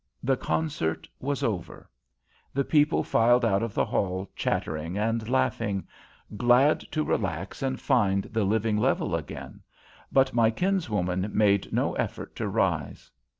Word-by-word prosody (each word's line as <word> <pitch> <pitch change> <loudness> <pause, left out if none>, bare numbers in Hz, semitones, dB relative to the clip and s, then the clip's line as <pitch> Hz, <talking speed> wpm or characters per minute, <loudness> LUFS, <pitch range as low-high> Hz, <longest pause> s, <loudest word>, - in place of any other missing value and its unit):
The 135 +1 +2
concert 140 - -2
was 140 +1 -2
over; 105 -10 -3 0.7
the 140 - +2
people 150 +1 +3
filed 120 +2 +3
out 100 -3 +2
of 115 -3 -3
the - - +2
hall 95 -1 -2
chattering 80 +4 -2
and 115 +1 -1
laughing, 115 -6 0 0.5
glad 125 +7 +4
to 155 0 +1
relax 95 - -2
and 130 -1 -1
find 100 -8 +2
the 110 -1 -2
living 110 +2 +1
level 105 - +1
again, - - -7 0.5
but 135 -1 +3
my 115 -2 +4
kinswoman 110 - -1
made 100 -2 +2
no - - 0
effort - - -4
to - - -2
rise. - - -1
115 Hz, 140 wpm, -27 LUFS, 100-130 Hz, 0.7 s, glad